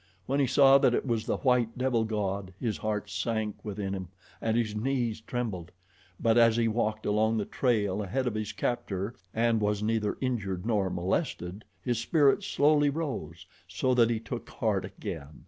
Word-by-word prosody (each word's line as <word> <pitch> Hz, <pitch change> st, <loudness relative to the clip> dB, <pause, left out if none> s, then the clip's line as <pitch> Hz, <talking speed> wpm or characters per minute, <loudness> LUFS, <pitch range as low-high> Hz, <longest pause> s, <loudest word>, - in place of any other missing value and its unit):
When 140 Hz, +2 st, 0 dB
he 135 Hz, -, +3 dB
saw 135 Hz, +2 st, +6 dB
that 130 Hz, -3 st, +4 dB
it -, -, -1 dB
was 115 Hz, -2 st, -1 dB
the -, -, 0 dB
white 125 Hz, -3 st, +1 dB
devil 125 Hz, -3 st, +1 dB
god 100 Hz, -3 st, -2 dB
his 115 Hz, -4 st, -1 dB
heart 105 Hz, -1 st, -2 dB
sank 105 Hz, +2 st, -2 dB
within 100 Hz, -2 st, -4 dB
him 95 Hz, -2 st, -4 dB, 0.3 s
and 115 Hz, 0 st, +1 dB
his 110 Hz, -3 st, 0 dB
knees 120 Hz, -1 st, -1 dB
trembled; 110 Hz, -8 st, -4 dB, 0.5 s
but 115 Hz, 0 st, +4 dB
as 115 Hz, -1 st, +5 dB
he 115 Hz, -1 st, +3 dB
walked 110 Hz, -1 st, -1 dB
along 110 Hz, +2 st, +2 dB
the 105 Hz, -, -1 dB
trail 105 Hz, -6 st, 0 dB
ahead 110 Hz, +7 st, -1 dB
of 120 Hz, -, 0 dB
his 110 Hz, -1 st, -3 dB
captor 100 Hz, -3 st, -2 dB, 0.2 s
and 115 Hz, -1 st, +2 dB
was 105 Hz, 0 st, 0 dB
neither 110 Hz, -1 st, 0 dB
injured 100 Hz, -8 st, -2 dB
nor 105 Hz, -5 st, +1 dB
molested 90 Hz, -, -2 dB, 0.2 s
his 120 Hz, -3 st, 0 dB
spirits 140 Hz, +3 st, +3 dB
slowly 145 Hz, 0 st, +4 dB
rose, 130 Hz, -, -4 dB, 0.2 s
so 90 Hz, +9 st, 0 dB
that 120 Hz, -2 st, +4 dB
he 115 Hz, -2 st, 0 dB
took 110 Hz, -, -6 dB
heart -, -, -1 dB
again. 70 Hz, +2 st, -7 dB
110 Hz, 180 wpm, -29 LUFS, 105-125 Hz, 0.5 s, saw